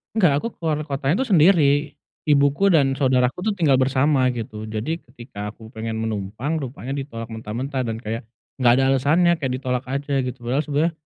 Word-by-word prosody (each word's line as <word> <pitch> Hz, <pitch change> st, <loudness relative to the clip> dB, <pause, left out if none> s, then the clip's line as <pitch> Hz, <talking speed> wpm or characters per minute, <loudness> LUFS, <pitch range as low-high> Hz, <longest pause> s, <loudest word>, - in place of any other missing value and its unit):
Enggak, 155 Hz, -9 st, +3 dB
aku -, -, 0 dB
keluar 160 Hz, -3 st, 0 dB
kotanya 145 Hz, -, 0 dB
itu -, -, -7 dB
sendiri. 150 Hz, -4 st, +4 dB, 0.3 s
Ibuku 145 Hz, +6 st, +3 dB
dan 140 Hz, -6 st, +4 dB
saudaraku 130 Hz, +1 st, +2 dB
tuh, 210 Hz, -, +2 dB
tinggal 145 Hz, -8 st, +3 dB
bersama, 135 Hz, 0 st, +2 dB
gitu. 110 Hz, -1 st, -6 dB
Jadi, 115 Hz, +10 st, -3 dB
ketika 120 Hz, -6 st, -9 dB
aku 110 Hz, +1 st, -13 dB
pengen 110 Hz, 0 st, -4 dB
menumpang, 110 Hz, +8 st, -3 dB
rupanya 135 Hz, -1 st, -6 dB
ditolak 115 Hz, -5 st, -6 dB
mentah-mentah 120 Hz, +5 st, -4 dB
dan 115 Hz, -, -2 dB
kayak, 115 Hz, 0 st, -5 dB, 0.3 s
nggak 120 Hz, -2 st, +5 dB
ada 135 Hz, -, +3 dB
alasannya, 155 Hz, +7 st, +3 dB
kayak 135 Hz, -3 st, -2 dB
ditolak 125 Hz, -1 st, -2 dB
aja, 140 Hz, +1 st, -1 dB
gitu. 125 Hz, 0 st, -4 dB
Padahal 125 Hz, +5 st, 0 dB
sebenarnya, 150 Hz, +4 st, +1 dB
135 Hz, 175 wpm, -22 LUFS, 120-145 Hz, 0.3 s, nggak